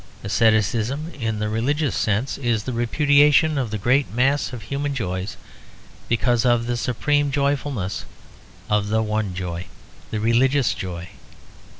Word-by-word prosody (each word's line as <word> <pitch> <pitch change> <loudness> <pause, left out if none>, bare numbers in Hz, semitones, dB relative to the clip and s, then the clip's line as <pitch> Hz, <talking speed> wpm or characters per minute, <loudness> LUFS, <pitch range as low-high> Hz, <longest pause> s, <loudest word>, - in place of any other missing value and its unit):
Asceticism, 115 - +1
in 115 -5 -3
the 105 0 -1
religious 135 +6 0
sense, 110 +7 -1
is 120 -5 0
the 130 - -4
repudiation 145 +5 +4
of 125 -4 -2
the 110 - -3
great 130 +7 +1
mass 130 +4 +1
of 120 -3 -7
human 140 0 -3
joys 95 -4 -3 0.7
because 120 0 +2
of 120 -1 +2
the 120 0 -1
supreme 145 +5 0
joyfulness 140 -8 -1 0.6
of 105 -1 +1
the 110 +1 +1
one 105 -3 -2
joy, 90 -1 -4 0.4
the 110 - -3
religious 125 +4 +2
joy. 85 -2 -6
120 Hz, 135 wpm, -22 LUFS, 105-140 Hz, 0.7 s, repudiation